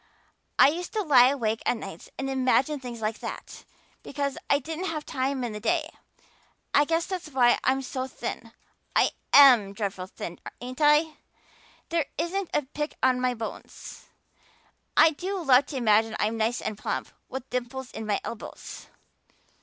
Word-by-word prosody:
I - - +8
used 345 +4 -5
to 430 -2 0
lie 255 -7 +7
awake 225 -5 -1
at 245 - +1
nights 195 -6 -9
and 270 - -3
imagine 265 +2 +1
things 240 -3 -8
like 215 +1 -2
that, - - -8 0.4
because 280 -1 -3
I 280 - +5
didn't 320 +6 -5
have 310 -4 -3
time 265 0 -2
in 235 -3 -3
the 210 - -5
day. 315 +7 0 0.8
I 290 - +5
guess 330 +2 0
that's 365 -5 -5
why 250 -4 +4
I'm 265 +1 +1
so 260 0 -4
thin - - -6 0.4
I - - +4 0.2
am 245 -8 +7
dreadful 195 -3 -4
thin, 175 -2 -8 0.2
ain't 255 +3 -7
I? 300 +1 +4 0.7
There 330 -3 +1
isn't 350 +3 -2
a 295 - +1
pick 295 +3 -5
on 255 -1 +3
my 250 -1 +1
bones. 225 -1 -8 0.9
I 315 +1 +7
do 370 +6 -4
love 275 -4 +4
to 280 - -5
imagine 220 -2 +3
I'm 215 +2 0
nice 225 +2 0
and 215 - -4
plump, - - -3 0.2
with 265 0 -6
dimples 250 +1 -4
in 220 - -6
my 205 - +1
elbows." 230 - -8
265 Hz, 165 wpm, -26 LUFS, 235-300 Hz, 0.9 s, I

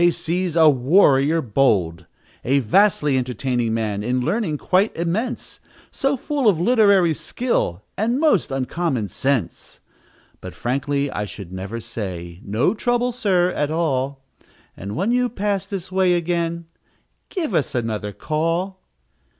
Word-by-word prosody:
's 175 0 0
a 160 -2 +6
warrior 145 +2 +4
bold, 95 -9 +1 0.4
"A 135 +3 +2
vastly 145 - +3
entertaining 125 -1 -1
man, 105 -3 -2
In 125 +4 0
Learning 165 - -1
quite 190 +8 +1
immense, 185 +9 -3 0.3
So 275 0 0
full 280 -3 +1
of 175 -6 +1
literary 200 -5 +4
skill, 145 - -2
And 235 +5 0
most 295 - +3
uncommon 135 - -2
sense, 130 -1 -2 0.6
"But, - - -9
frankly, 140 +3 -1
I 105 - -3
should 95 -3 -9
never 95 +5 -5
say 95 -6 -6
'No 110 - +1
trouble, 245 +2 0
sir, 190 -7 +1
at 150 -4 -1
all; 140 -4 -1 0.5
And 100 +2 -6
when 195 +8 0
you 250 0 +2
pass 200 -3 -2
this 190 -2 -6
way 185 -1 +3
again, 170 -1 -1 0.6
_Give 330 - -3
us 150 -6 0
another 110 -3 -2
call! 165 - -2
155 Hz, 135 wpm, -21 LUFS, 120-195 Hz, 0.6 s, a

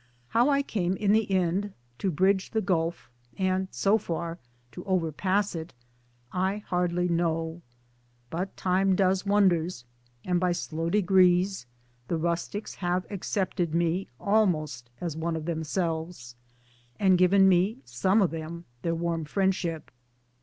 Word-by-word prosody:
How 240 +5 +3
I 280 -1 +3
came 190 -8 -1
in 205 0 +1
the 215 -1 +2
end 190 +2 0 0.3
to 195 - 0
bridge 190 +3 +2
the 220 - 0
gulf 165 - -1 0.3
and 185 0 0
(so 205 +3 +2
far) 170 -2 -4 0.3
to 180 - -8
overpass 185 +3 0
it 160 -5 -7 0.6
I 190 +2 0
hardly 180 -1 0
know; 165 -1 -1 0.7
but 185 +4 -4
Time 190 +1 +2
does 190 +1 +1
wonders, 180 -9 +2 0.4
and 180 -1 +1
by 180 -1 +2
slow 165 -1 -3
degrees 185 -3 +3 0.4
the 165 - -1
rustics 170 +5 -2
have 180 0 -1
accepted 185 -4 -2
me 170 +2 +1
almost 155 - +1
as 170 -4 -3
one 165 +1 -2
of 160 -1 -4
themselves 160 -5 -3 0.6
and 190 -2 +5
given 190 +2 +5
me, 190 +3 +3
some 185 - +2
of 175 - +1
them, 165 +1 -6 0.2
their 165 -1 -1
warm! 165 -1 -1
friendship. 180 -3 -1
180 Hz, 135 wpm, -27 LUFS, 165-190 Hz, 0.7 s, and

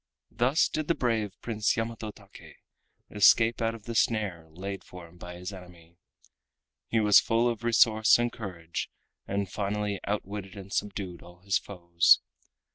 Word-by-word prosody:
Thus 130 +6 +2
did 155 -1 -3
the 170 - +2
brave 110 -5 -1
Prince 110 -2 0
Yamato 115 -1 -3
Take 100 -1 -14 0.6
escape 115 +3 +4
out 115 0 0
of 110 - -13
the 115 - -6
snare 105 -8 0
laid 95 +4 -6
for 90 -2 -11
him 85 +1 -20
by 90 0 -8
his 90 +3 -7
enemy. 90 -2 -14 0.9
He 115 - +1
was 105 -2 +7
full 115 +1 +1
of 115 -2 -2
resource 110 -2 +5
and 120 0 0
courage, 90 -7 -6 0.4
and 100 0 -1
finally 105 +1 -2
outwitted 100 -1 -4
and 100 0 -9
subdued 95 -4 -3
all 90 0 -15
his 95 0 +1
foes. 85 -3 +3
100 Hz, 155 wpm, -28 LUFS, 90-115 Hz, 0.9 s, was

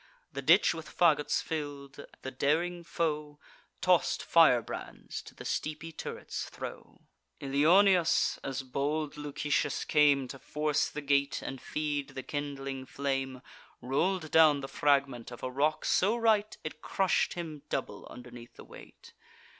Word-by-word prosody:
The - - -4
ditch - - +5
with 160 -1 -8
fagots 150 -4 +2
fill'd, 145 -2 -6 0.2
the 130 - -4
daring 170 +6 0
foe 150 -3 -2 0.4
Toss'd - - +2
firebrands - - +2
to - - -14
the - - -10
steepy 155 +2 -3
turrets - - -6
throw. - - -9 0.4
Ilioneus, 170 +6 +4
as 135 0 -3
bold 145 +3 -2
Lucetius 145 -1 -1
came 145 -3 +4
To 135 - -8
force 150 +1 0
the 150 - -6
gate, 140 0 +1
and 135 - -6
feed 145 -2 -3
the 130 - -5
kindling 135 -2 -5
flame, 135 -2 -3 0.4
Roll'd 155 +6 -1
down 155 -3 +6
the 135 - -5
fragment 135 -5 +1
of 120 - -11
a 130 - -3
rock 145 +4 0
so 210 +6 +2
right, 215 -2 +2
It 155 0 -7
crush'd 190 -2 +1
him 160 -4 -6
double - - -4
underneath 120 -1 -12
the - - -12
weight. - - -14
145 Hz, 140 wpm, -30 LUFS, 135-155 Hz, 0.4 s, down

